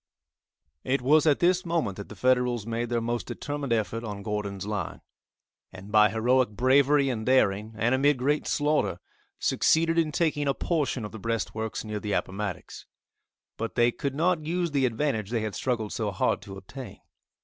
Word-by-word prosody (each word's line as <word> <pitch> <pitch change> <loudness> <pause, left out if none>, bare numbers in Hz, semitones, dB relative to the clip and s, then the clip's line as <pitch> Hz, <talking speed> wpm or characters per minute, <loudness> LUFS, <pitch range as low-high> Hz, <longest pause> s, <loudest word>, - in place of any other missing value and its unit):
It 130 0 0
was 155 +4 +4
at 145 - +5
this 180 +1 +2
moment 165 - -1
that 100 - -8
the 110 - -9
Federals 125 -1 +1
made 115 +1 -2
their 120 -1 +1
most 120 +1 -2
determined 145 -3 -4
effort 115 0 0
on 105 -3 -6
Gordon's 100 -2 -3
lines, 105 -3 -4 0.7
and 95 +2 -11
by 105 0 +6
heroic 125 +4 +2
bravery 135 +5 +3
and 115 -4 -2
daring, 110 -4 +2
and 115 +3 +2
amid 140 +2 +3
great 145 +4 0
slaughter, 150 +1 +1 0.4
succeeded 165 +1 +2
in 155 -2 +1
taking 150 -2 0
a 140 - +1
portion 140 -9 -1
of 105 - -7
the 110 - -8
breastworks 110 0 -3
near 105 -1 -4
the 105 -1 -3
Appomattox. 95 -1 -4 0.7
But 115 0 -4
they 120 0 +4
could 140 +1 -4
not 165 +1 +1
use 170 +1 -1
the 135 -3 +2
advantage 115 -4 -1
they 115 -1 -1
had 110 -1 -3
struggled 115 -5 -2
so 110 -2 -1
hard 100 +1 0
to 100 -2 -9
obtain. 115 +3 -10
120 Hz, 175 wpm, -27 LUFS, 105-145 Hz, 0.7 s, by